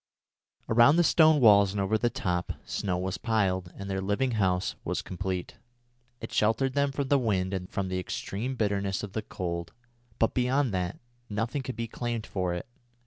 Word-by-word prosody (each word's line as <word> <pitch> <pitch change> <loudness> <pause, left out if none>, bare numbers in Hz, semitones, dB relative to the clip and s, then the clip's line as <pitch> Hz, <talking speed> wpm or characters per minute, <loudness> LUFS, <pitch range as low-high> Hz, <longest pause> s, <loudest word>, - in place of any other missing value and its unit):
Around 120 +6 +6
the 175 - +5
stone 155 -2 +5
walls 100 -5 +6
and 105 - -2
over 100 +2 +1
the 120 +2 +2
top, 90 -5 -2
snow 95 -3 -2
was 95 +1 -3
piled, 95 -6 0
and 100 - -7
their 95 -1 -2
living 105 +7 0
house 95 -4 +1
was - - -2
complete. 95 -1 -4 0.6
It - - -8
sheltered 120 +5 +2
them 140 0 +1
from 135 -1 -3
the 140 - +4
wind 95 -6 0
and 90 -1 -4
from 100 -1 -2
the 95 0 -2
extreme 110 +7 -4
bitterness 100 -4 -1
of 100 -2 -6
the 110 - -1
cold, 85 -5 -5 0.4
but 115 - +2
beyond 130 -1 +1
that 90 0 -2 0.3
nothing 115 +7 -2
could 130 -1 -5
be 115 +1 -3
claimed 120 -1 -3
for 90 -4 -2
it. 90 - -5
105 Hz, 185 wpm, -28 LUFS, 95-120 Hz, 0.6 s, Around